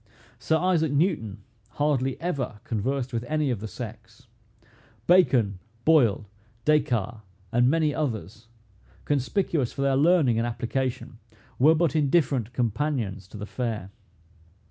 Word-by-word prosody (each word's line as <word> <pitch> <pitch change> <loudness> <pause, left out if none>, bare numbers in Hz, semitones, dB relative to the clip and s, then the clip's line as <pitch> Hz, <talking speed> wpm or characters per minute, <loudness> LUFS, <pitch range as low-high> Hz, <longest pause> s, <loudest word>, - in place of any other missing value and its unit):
Sir 140 +9 +1
Isaac 165 -3 +1
Newton 145 - 0 0.3
hardly 135 -3 0
ever 140 -10 -3
conversed 125 +4 -2
with 115 0 -2
any 150 -3 0
of 120 - -2
the 110 - -5
sex. 115 +1 -9 0.8
Bacon, 130 - +4 0.3
Boyle, 120 -10 +3 0.4
Des 150 0 +5
Cartes, 115 -4 -3 0.3
and 120 +2 +3
many 155 -1 +2
others, 110 - -4 0.6
conspicuous 145 - 0
for 140 - -3
their 135 -1 +2
learning 145 -5 +3
and 115 - 0
application, 120 0 -3 0.4
were 155 +5 +6
but 160 -3 +1
indifferent 140 -6 +1
companions 120 -5 -2
to 105 - -11
the 105 - -5
fair. 110 -4 -4
130 Hz, 125 wpm, -26 LUFS, 115-150 Hz, 0.8 s, were